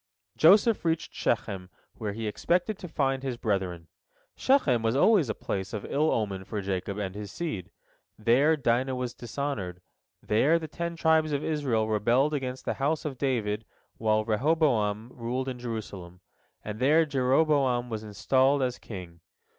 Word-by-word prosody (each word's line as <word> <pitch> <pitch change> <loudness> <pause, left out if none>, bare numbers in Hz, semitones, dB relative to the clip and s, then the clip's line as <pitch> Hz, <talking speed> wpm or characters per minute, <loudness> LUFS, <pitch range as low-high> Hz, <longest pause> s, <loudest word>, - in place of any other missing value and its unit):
Joseph 205 +7 +5
reached 165 -1 -1
Shechem, 90 -2 -2 0.2
where 105 -3 -4
he 110 +1 -5
expected 180 - 0
to 180 - -7
find 135 -4 0
his 130 -3 -3
brethren. 95 -7 -2 0.5
Shechem 150 - +3
was 115 +2 +1
always 175 - +4
a 110 - -1
place 95 -1 -4
of 105 - -4
ill 150 +3 +1
omen 100 -4 -1
for 105 +2 -4
Jacob 95 0 -3
and 100 -3 -3
his 105 0 -7
seed—there 125 - -1
Dinah 130 0 +1
was 125 -1 -3
dishonored, 120 -8 -4 0.4
there 135 +10 +3
the 160 -1 -5
Ten 170 +2 -4
Tribes 160 -2 +2
of 145 +1 -1
Israel 130 -8 0
rebelled 120 +7 +2
against 130 -3 -3
the - - 0
house 155 +3 0
of 135 -4 -4
David 110 -6 -1 0.4
while 110 -1 +2
Rehoboam 115 -3 +1
ruled 125 +2 -3
in 125 -2 -4
Jerusalem, 100 -7 -6 0.4
and 105 0 -5
there 155 +6 +4
Jeroboam 135 -3 +2
was 110 -1 -3
installed 130 +6 +2
as 125 -1 -2
king. 90 -5 -9
125 Hz, 155 wpm, -28 LUFS, 105-145 Hz, 0.5 s, Joseph